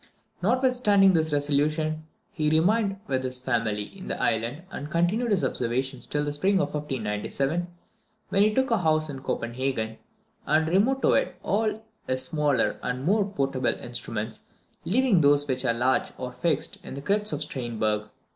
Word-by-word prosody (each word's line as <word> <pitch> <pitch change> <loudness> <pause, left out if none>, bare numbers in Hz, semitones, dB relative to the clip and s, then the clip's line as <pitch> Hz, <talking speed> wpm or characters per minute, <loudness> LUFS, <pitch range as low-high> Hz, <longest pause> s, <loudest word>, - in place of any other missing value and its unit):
Notwithstanding 230 -3 +4
this 160 -2 +2
resolution, 155 +2 0 0.2
he 155 -2 0
remained 195 +6 +2
with 130 -8 -1
his 130 -1 -1
family 115 -5 -1
in 190 - -9
the - - -3
island, 115 +8 -1
and 145 - -6
continued 175 +9 +1
his 200 -8 +2
observations 130 +1 -2
till 145 0 -1
the 145 0 -2
spring 190 +7 +1
of 190 - +1
1597, 135 +4 -2 0.6
when 195 - +2
he 215 +1 +5
took 265 +3 +1
a 230 - +3
house 155 -2 +2
in 135 -1 -7
Copenhagen, 120 -3 -2 0.5
and 155 +1 +3
removed 215 +11 +2
to - - +5
it - - +1
all 215 +1 0 0.2
his 130 0 0
smaller 150 -5 +1
and 125 +1 -3
more 200 +5 +2
portable 135 -7 0
instruments, 115 -2 -4 0.5
leaving 230 -3 +3
those 145 0 +4
which 130 -1 -1
were 125 - +2
large 125 +3 +1
or 125 -1 -5
fixed 150 +4 -1
in - - -7
the 140 - -6
crypts 210 +5 +1
of 150 - -3
Stiern 120 -6 -5
berg. 105 0 0
150 Hz, 165 wpm, -26 LUFS, 130-195 Hz, 0.6 s, he